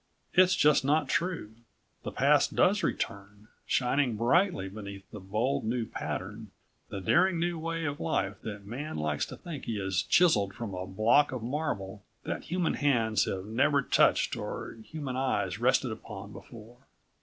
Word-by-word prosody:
It's 185 0 +5
just 150 -2 +4
not 145 0 +2
true. 170 -12 -1 0.5
The - - -5
past - - +3
does - - +4
return, 100 +2 -4 0.2
shining 125 -1 +1
brightly 135 - +2
beneath 100 -1 -8
the 105 - -7
bold 105 +8 -1
new 115 +1 -1
pattern, 105 +1 -5 0.4
the 100 - -5
daring 175 - +3
new 170 0 -1
way 165 0 -3
of 145 0 -3
life 100 - -1
that 100 -2 -7
Man 135 +9 -5
likes 75 -1 -1
to - - -9
think 165 -7 -8
he 115 - -2
has 95 -3 0
chiseled 105 - +3
from 115 -4 -5
a 90 0 -5
block 110 +9 +3
of 125 -3 -5
marble 115 -8 -3 0.2
that - - -4
human 180 -1 0
hands 115 -8 +2
have 95 0 -3
never 140 +6 +2
touched - - +3
or - - -5
human 145 -2 -5
eyes 125 -7 -1
rested 125 0 +2
upon 105 -2 -8
before. 115 +1 -12
115 Hz, 160 wpm, -29 LUFS, 100-145 Hz, 0.5 s, It's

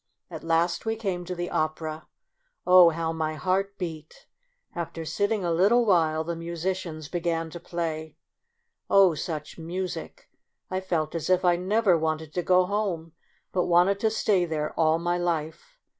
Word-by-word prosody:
At - - -7
last 165 +1 +1
we 225 0 -1
came 190 -5 -3
to 180 +1 -4
the 175 0 -4
opera. 155 0 -2 0.6
Oh, 180 -1 +8
how 165 0 -2
my 155 -1 -2
heart 195 +4 -1
beat! 160 -4 -7 0.5
After 165 -1 -5
sitting 205 +5 0
a 170 - 0
little 205 +8 +4
while, 160 -5 +2
the 170 +1 -3
musicians 170 -1 -4
began 165 -1 -2
to 170 - -7
play. 160 -3 -4 0.7
Oh! 195 -3 +6
such 155 +1 -5
music; 180 +3 -5 0.4
I 185 0 -1
felt 165 -5 -1
as 165 0 -3
if 185 0 +3
I 175 -1 +5
never 190 +2 +2
wanted 160 -1 -2
to 180 - 0
go 180 +1 +4
home, 185 -5 -2 0.4
but 180 -2 +1
wanted 180 +3 +3
to 220 - +2
stay 210 -4 +2
there 155 -3 -2
all 160 -1 +3
my 175 +1 -1
life. 175 - -3
170 Hz, 160 wpm, -26 LUFS, 160-185 Hz, 0.7 s, Oh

